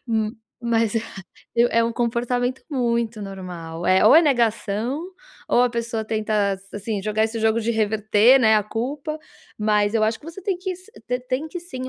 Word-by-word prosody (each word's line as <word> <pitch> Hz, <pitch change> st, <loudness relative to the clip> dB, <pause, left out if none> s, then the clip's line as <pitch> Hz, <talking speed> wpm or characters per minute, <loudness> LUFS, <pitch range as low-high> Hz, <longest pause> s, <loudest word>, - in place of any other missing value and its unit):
Hum, 220 Hz, -1 st, 0 dB, 0.3 s
mas 230 Hz, -1 st, +1 dB
é 230 Hz, +3 st, -2 dB
é -, -, +3 dB
um 230 Hz, -, -1 dB
comportamento 245 Hz, +2 st, -1 dB
muito 235 Hz, -5 st, -1 dB
normal, 175 Hz, -4 st, -7 dB
eh, 185 Hz, +2 st, +4 dB
ou 215 Hz, -, +8 dB
é 330 Hz, -, +8 dB
negação 235 Hz, 0 st, 0 dB, 0.5 s
ou 245 Hz, -, +4 dB
a 250 Hz, -, +2 dB
pessoa 230 Hz, -1 st, -3 dB
tenta, 215 Hz, -3 st, 0 dB, 0.2 s
assim, 205 Hz, -1 st, -3 dB
jogar 215 Hz, +1 st, +1 dB
esse 225 Hz, +1 st, -3 dB
jogo 220 Hz, +1 st, +2 dB
de 225 Hz, -, -1 dB
reverter, 220 Hz, +3 st, +4 dB
né, 220 Hz, -2 st, +5 dB
a 210 Hz, -, +2 dB
culpa. 275 Hz, +8 st, -4 dB, 0.4 s
Mas 210 Hz, 0 st, +2 dB
eu 215 Hz, -1 st, +3 dB
acho 220 Hz, +1 st, 0 dB
que -, -, -18 dB
você 335 Hz, +4 st, -8 dB
tem 385 Hz, -2 st, -1 dB
que 370 Hz, 0 st, -3 dB
se 370 Hz, +4 st, -19 dB, 0.2 s
te 250 Hz, 0 st, -1 dB
tem 255 Hz, +4 st, -3 dB
que, 355 Hz, +2 st, -6 dB
sim, 260 Hz, -7 st, -7 dB
230 Hz, 185 wpm, -23 LUFS, 215-250 Hz, 0.5 s, ou